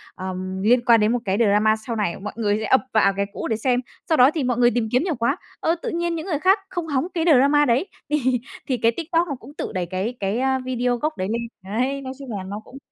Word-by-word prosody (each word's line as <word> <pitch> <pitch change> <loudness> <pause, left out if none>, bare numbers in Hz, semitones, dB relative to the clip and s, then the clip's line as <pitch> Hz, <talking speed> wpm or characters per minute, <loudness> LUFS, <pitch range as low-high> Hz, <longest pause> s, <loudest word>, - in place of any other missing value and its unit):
ờm, 185 0 -5
liên 240 +2 +4
quan 230 -2 +6
đến 210 +1 +3
một 245 - +1
cái 195 0 0
drama 215 0 +4
sau 220 +1 -5
này". 205 -5 -1
Mọi 210 +2 -6
người 210 -2 +1
sẽ 220 - -3
ập 260 - +4
vào 195 -3 +4
cái 200 - +1
cũ - - -4
để 220 - 0
xem, 245 +1 +1 0.3
sau 315 - +3
đó 255 +4 +7
thì 295 - 0
mọi 245 -1 0
người 240 0 +5
tìm 235 -2 0
kiếm 250 +5 +3
nhiều 345 -5 -1
quá, 230 0 0 0.2
ơ, 330 - +1
tự - - -3
nhiên 340 0 -1
những 320 - -4
người 300 -6 -1
khác 380 +5 +4
không 345 -3 -4
hóng 285 +3 0
cái 330 - 0
drama 290 +3 +4
đấy, 265 - +2 0.2
thì 260 -5 +1 0.3
thì 255 -2 0
cái 230 +1 +3
TikTok 335 +1 0
nó 280 - -3
cũng 285 - -13
tự - - -5
đẩy 180 -1 -1
cái 195 +8 -3
cái, 200 +4 -1
a, 265 0 +1
video 250 -1 -1
gốc 305 +6 -2
đấy 185 - -2
lên. 235 +1 -1 0.2
Đấy, 255 +8 -1
nói 260 0 -6
chung 265 -4 -8
là 190 - -5
nó 200 +3 -6
cũng 270 - -12
245 Hz, 275 wpm, -23 LUFS, 215-280 Hz, 0.3 s, đó